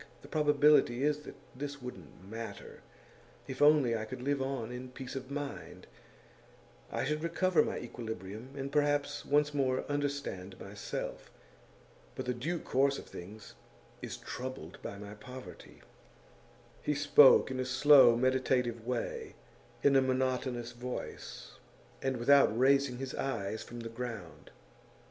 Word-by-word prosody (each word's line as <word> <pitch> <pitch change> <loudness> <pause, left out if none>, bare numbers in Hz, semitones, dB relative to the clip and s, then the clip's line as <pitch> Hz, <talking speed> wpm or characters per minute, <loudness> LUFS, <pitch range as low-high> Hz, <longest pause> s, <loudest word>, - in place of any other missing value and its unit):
The - - -11
probability 150 -4 +4
is 150 0 +2
that 150 - -10 0.2
this 140 +1 -5
wouldn't 95 - -10
matter, 115 +2 -8 0.7
if 130 0 -6
only 145 -5 +5
I 110 -1 -3
could 125 - -7
live 140 0 0
on 130 -4 -3
in 125 +1 -7
peace 130 +1 -8
of 130 0 -6
mind; 145 0 -6 1.1
I - - -1
should 150 +2 -1
recover 170 0 +2
my - - -3
equilibrium, 110 -1 -7
and 140 0 -4
perhaps 145 0 +1
once 145 +1 +2
more 130 -2 0
understand 140 -10 -3
myself. 100 +1 -6 0.9
But - - -4
the 125 - 0
due 155 +9 -2
course 140 -2 +1
of - - -8
things 100 +4 -10 0.5
is - - -5
troubled 125 -10 -7
by 100 - -6
my 105 0 -8
poverty.' 125 +4 -11 1.0
He 150 - 0
spoke 145 -1 +7
in 130 - -3
a - - +1
slow, 130 -1 +7
meditative 125 -2 +1
way, 125 -2 -3 0.5
in 140 -1 +5
a 135 - +7
monotonous 130 -2 -1
voice, 125 +1 -7 0.4
and 135 -1 -1
without 120 -2 +5
raising 135 0 +3
his 130 0 -5
eyes 110 -5 -3
from 120 0 -8
the 115 - -5
ground. 110 - -7
130 Hz, 140 wpm, -32 LUFS, 120-140 Hz, 1.1 s, spoke